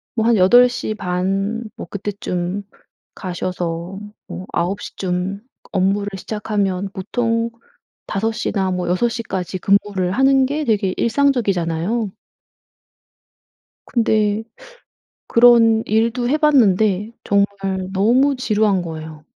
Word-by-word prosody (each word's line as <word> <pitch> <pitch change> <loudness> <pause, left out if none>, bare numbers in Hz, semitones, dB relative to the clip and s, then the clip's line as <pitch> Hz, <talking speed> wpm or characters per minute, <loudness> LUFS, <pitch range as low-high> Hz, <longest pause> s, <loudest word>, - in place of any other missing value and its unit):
뭐 225 -2 +1
한 235 0 +4
8:30 200 -1 +2
뭐 - - -8
그때쯤 200 -1 -4 0.5
가셔서 180 0 -4 0.3
뭐 185 - -7
9:00 180 +4 -2
쯤 185 +2 -2 0.3
업무를 195 +2 +1
시작하면 200 -2 -2
보통 230 +3 -1 0.6
5:00 220 +3 -2
나 190 -2 0
뭐 180 -1 -2
6:00 230 +6 0
까지 185 -3 -4
근무를 195 -2 +1
하는 270 +3 +4
게 295 +3 -2
되게 205 -5 +1
일상적이잖아요. 220 - 0 1.7
근데 220 -2 +1 0.8
그런 230 -2 +5
일도 230 +3 +1
해봤는데 220 - +3
정말 200 0 +3 0.5
너무 250 +8 +3
지루한 215 -6 +1
거예요. 160 -2 -8
205 Hz, 185 characters per minute, -20 LUFS, 185-230 Hz, 1.7 s, 그런